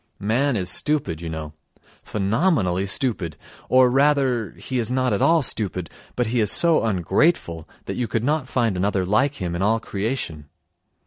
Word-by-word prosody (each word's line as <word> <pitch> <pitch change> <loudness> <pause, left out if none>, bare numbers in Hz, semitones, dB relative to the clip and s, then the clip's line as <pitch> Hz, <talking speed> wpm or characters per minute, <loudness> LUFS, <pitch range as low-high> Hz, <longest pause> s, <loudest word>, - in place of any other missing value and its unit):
Man 120 +7 0
is 90 -3 -1
stupid, 140 - -1
you 85 - -5
know, 80 -1 -6 0.5
phenomenally 100 - 0
stupid; 100 - -1 0.3
or 130 0 +6
rather 135 - +2
he 125 +8 -3
is 115 - -2
not 130 -2 +1
at 100 - -1
all 165 -2 +4
stupid, 95 -8 -1 0.2
but 125 - 0
he 120 +2 -1
is 105 - +2
so 170 -2 +4
ungrateful 95 - 0 0.2
that - - -5
you 125 -2 -1
could 115 +1 -2
not 145 0 0
find 115 -7 0
another 95 0 0
like 130 +9 +1
him 90 -7 -4
in 85 - -3
all 110 +3 +2
creation. 100 - -4
110 Hz, 170 wpm, -22 LUFS, 90-130 Hz, 0.5 s, or